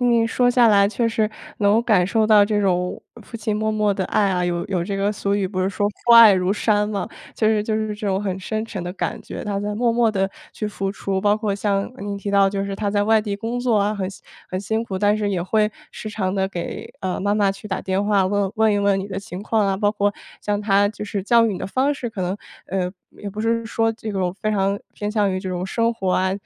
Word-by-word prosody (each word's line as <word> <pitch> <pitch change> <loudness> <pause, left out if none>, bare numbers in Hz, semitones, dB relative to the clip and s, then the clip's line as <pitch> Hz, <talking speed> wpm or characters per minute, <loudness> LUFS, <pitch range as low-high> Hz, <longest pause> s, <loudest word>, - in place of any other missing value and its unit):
你 235 -2 +3
说 245 +2 +2
下 245 -2 +5
来 200 -1 +5
确 230 +2 0
实 220 -1 0 0.3
能 210 +2 +3
感 200 -7 +3
受 220 +1 +2
到 215 -1 +6
这 210 0 0
种 180 -2 0 0.2
父 230 - -9
亲 215 -1 -2
默 215 +1 0
默 210 -1 +1
的 195 - -2
爱 205 -2 +2
啊， 180 -1 0
有 175 -1 -1
有 185 -3 -1
这 195 +3 -3
个 200 +1 +1
俗 200 -1 -1
语 200 -2 0
不 185 0 -3
是 185 - +1
“说 205 +1 -1
父 235 +3 +1
爱 230 -3 +10
如 185 -1 +1
山” 210 0 +1
嘛。 200 -3 -2 0.3
就 220 - +1
是 215 -1 +3
就 215 0 -2
是 215 -1 -2
这 210 0 -5
种 195 0 0
很 190 -2 -2
深 215 +3 -3
沉 200 -5 -6
的 175 - -4
感 - - -3
觉， - - -7
他 200 -1 -2
在 205 0 -3
默 235 +1 +1
默 230 -1 +3
地 195 -2 0 0.2
去 215 - -4
付 195 -2 -3
出。 195 -1 -2
包 205 +1 +3
括 215 -2 -1
像 200 0 -1
你 205 -2 -4
提 200 0 -4
到 200 -1 +4
就 195 0 -2
是 200 0 -4
他 205 0 -2
在 205 0 +1
外 220 +1 +4
地 205 -2 -3
工 230 +3 -3
作 245 -3 +2
啊， 205 +1 +1
很 190 -3 -3
辛 195 - -12 0.3
很 185 - -3
辛 220 +3 -1
苦， 195 -5 -4
但 205 +1 +3
是 210 -1 -1
也 185 -4 -1
会 210 +3 +1 0.2
时 215 - -7
常 195 -3 -2
地 190 -1 0
给， 175 -3 -6
呃， 185 -1 -2
妈 205 +1 +1
妈 200 -2 +2
去 200 +2 -11
打 190 - -2
电 190 +1 0
话 205 -2 +2
问 200 0 0
问 220 -1 +3
一 205 - +1
问 200 -1 +2
你 195 - -4
的 195 -1 -4
情 190 -1 -8
况 215 -1 +1
啊。 195 -1 0
包 205 +1 +1
括 205 -1 +1 0.3
像 205 0 -1
他 205 -1 +3
就 210 0 -6
是 200 -1 -3
教 230 +3 +4
育 220 - 0
你 185 - -5
的 - - -4
方 260 +8 +1
式 260 -4 -4
可 220 -4 -7
能， 180 +2 -2 0.3
呃， 185 -2 -1 0.2
也 205 - -8
不 210 - -6
是 230 +1 0
说 225 0 +1
这 220 -1 -6
种 185 -3 -1
非 215 +2 -2
常 200 -1 +1 0.2
偏 205 0 -3
向 210 -3 +1
于 185 - -1
这 190 - -5
种 180 0 -3
生 230 +4 0
活 190 -5 -2
啊， 185 0 +1
205 Hz, 290 characters per minute, -22 LUFS, 195-215 Hz, 0.3 s, 爱